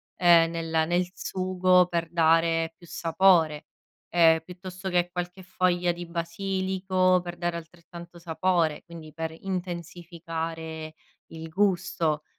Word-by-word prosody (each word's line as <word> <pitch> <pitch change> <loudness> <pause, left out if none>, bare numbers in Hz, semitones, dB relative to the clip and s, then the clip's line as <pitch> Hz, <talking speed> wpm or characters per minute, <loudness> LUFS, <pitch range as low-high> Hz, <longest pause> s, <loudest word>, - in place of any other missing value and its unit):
ehm, 170 -2 +5
nel 165 -1 -1
nel 175 +2 +1
sugo 185 -1 +2
per 170 -1 -2
dare 165 0 +3
più 175 - -16
sapore, 165 -3 +2 0.4
ehm, 165 -2 +5
piuttosto 185 +1 -8
che 175 -1 +1
qualche 180 +1 -5
foglia 180 -1 +1
di 175 0 -7
basilico 185 +2 0
per 175 0 -7
dare 175 -1 -2
altrettanto 170 +1 -12
sapore, 170 -2 0
quindi 165 -2 -11
per 160 0 -5
intensificare 165 -3 -5 0.4
il 160 0 -8
gusto, 175 -4 0
175 Hz, 115 wpm, -26 LUFS, 165-180 Hz, 0.4 s, ehm